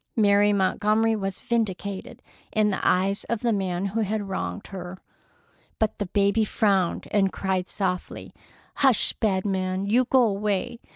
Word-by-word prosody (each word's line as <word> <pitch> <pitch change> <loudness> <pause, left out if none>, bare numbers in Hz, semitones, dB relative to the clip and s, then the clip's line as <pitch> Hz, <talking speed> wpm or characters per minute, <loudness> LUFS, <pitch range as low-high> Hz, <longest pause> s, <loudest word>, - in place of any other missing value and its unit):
Mary 205 -1 +4
Montgomery 215 +3 +2
was 195 -2 -3
vindicated 200 -4 -3 0.3
in 215 -1 +2
the 190 - -2
eyes 195 +2 +1
of 235 -2 -2
the 235 -2 +1
man 190 -2 -1
who 200 +3 -2
had 210 -1 -1
wronged 195 +1 -4
her. 185 -1 -7 0.8
But 220 -2 -1
the 205 - -2
baby 200 +3 +2
frowned 195 -4 +1
and 195 -2 +2
cried 190 -1 -2
softly: 180 -3 -3 0.4
"Hush, 265 -5 +3
bad 195 -3 0
man! 190 -1 -1
You 240 +5 +3
go 255 +1 +4
away! 210 +1 -1
200 Hz, 150 wpm, -25 LUFS, 190-215 Hz, 0.8 s, Mary